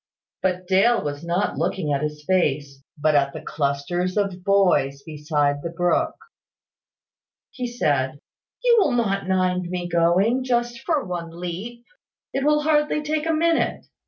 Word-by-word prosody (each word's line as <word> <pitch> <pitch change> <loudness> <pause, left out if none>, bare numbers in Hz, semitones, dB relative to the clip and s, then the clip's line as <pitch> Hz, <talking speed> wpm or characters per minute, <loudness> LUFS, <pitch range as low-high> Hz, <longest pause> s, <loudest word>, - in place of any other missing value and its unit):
But 185 -1 -1
Dale 195 +5 +3
was 145 0 -4
not 175 +4 -1
looking 155 -7 -1
at 140 - 0
his 150 0 -4
face, 145 -6 0 0.2
but 155 +1 +2
at 140 -1 +2
the - - -6
clusters 170 +6 -2
of 195 -3 -1
boys 180 -9 +2
beside 150 -2 -1
the 170 - -4
brook. 175 +1 0 1.4
He 250 -1 -4
said 145 - 0 0.4
"You 480 -1 +5
will 295 -10 +2
not 195 -5 0
mind 185 -1 +1
my 180 -1 -3
going, 175 +9 +2
just 240 -1 -1
for 315 -5 +1
one 175 -2 -4
leap. 180 +8 -7 0.5
It 270 - -1
will 300 +1 +3
hardly 300 0 +2
take 305 +1 -1
a - - +2
minute. 330 +1 +1
180 Hz, 150 wpm, -23 LUFS, 150-240 Hz, 1.4 s, You